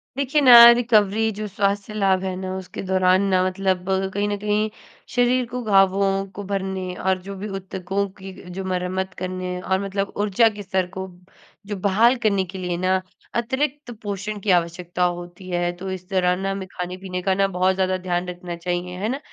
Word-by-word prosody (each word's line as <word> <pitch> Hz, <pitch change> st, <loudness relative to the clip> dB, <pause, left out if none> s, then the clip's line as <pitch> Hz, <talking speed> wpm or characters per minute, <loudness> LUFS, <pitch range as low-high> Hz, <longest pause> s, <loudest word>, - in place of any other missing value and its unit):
देखिए 280 Hz, +2 st, +1 dB
ना, 255 Hz, -3 st, +8 dB, 0.2 s
रिकवरी 220 Hz, -2 st, +3 dB
जो 215 Hz, 0 st, -3 dB
स्वास्थ्य 200 Hz, +1 st, -1 dB
लाभ 195 Hz, -3 st, +2 dB
है 185 Hz, -1 st, -2 dB
ना 185 Hz, 0 st, -4 dB
उसके 185 Hz, -1 st, -7 dB
दौरान 185 Hz, 0 st, +3 dB
ना 185 Hz, -1 st, +3 dB
मतलब 185 Hz, -1 st, -1 dB, 0.3 s
कहीं 205 Hz, +1 st, 0 dB
न 205 Hz, -, -1 dB
कहीं 210 Hz, +1 st, 0 dB, 0.5 s
शरीर 245 Hz, +1 st, +3 dB
को 250 Hz, +1 st, -5 dB
घावों 195 Hz, -1 st, +3 dB
को 205 Hz, -, -5 dB
भरने 190 Hz, -2 st, -3 dB
और 190 Hz, 0 st, 0 dB
जो 200 Hz, +1 st, -7 dB
भी 205 Hz, +3 st, -5 dB
उत्तकों 195 Hz, 0 st, -3 dB
की 190 Hz, 0 st, -8 dB
अ, -, -, -14 dB
जो 190 Hz, +2 st, -5 dB
मरम्मत 185 Hz, 0 st, -2 dB
करने 185 Hz, 0 st, -4 dB
और 190 Hz, 0 st, 0 dB
मतलब 195 Hz, 0 st, -3 dB
ऊर्जा 205 Hz, +2 st, +3 dB
के 205 Hz, -, -7 dB
स्तर 190 Hz, -1 st, -1 dB
को 190 Hz, 0 st, -4 dB, 0.6 s
जो 205 Hz, -, -3 dB
बहाल 215 Hz, +6 st, +4 dB
करने 200 Hz, -3 st, +2 dB
के 185 Hz, +2 st, -9 dB
लिए 180 Hz, -2 st, -3 dB
ना 185 Hz, +1 st, +1 dB, 0.3 s
अतिरिक्त 265 Hz, +3 st, -1 dB
पोषण 205 Hz, +1 st, -4 dB
की 200 Hz, 0 st, 0 dB
आवश्यकता 175 Hz, 0 st, 0 dB
होती 175 Hz, +1 st, -3 dB
है। 175 Hz, 0 st, 0 dB
तो 190 Hz, +2 st, -6 dB
इस 185 Hz, -1 st, -7 dB
दौरान 180 Hz, -1 st, +1 dB
ना 195 Hz, 0 st, -1 dB
हमें 195 Hz, -1 st, -5 dB
खाने-पीने 180 Hz, +1 st, -5 dB
का 190 Hz, +1 st, +1 dB
ना 195 Hz, 0 st, +3 dB
बहुत 185 Hz, 0 st, +1 dB
ज़्यादा 185 Hz, 0 st, +1 dB
ध्यान 180 Hz, -1 st, -2 dB
रखना 175 Hz, -1 st, -6 dB
चाहिए। 180 Hz, +1 st, -3 dB
है 205 Hz, +4 st, -2 dB
ना? 265 Hz, +3 st, -2 dB
190 Hz, 195 wpm, -22 LUFS, 185-205 Hz, 0.6 s, ना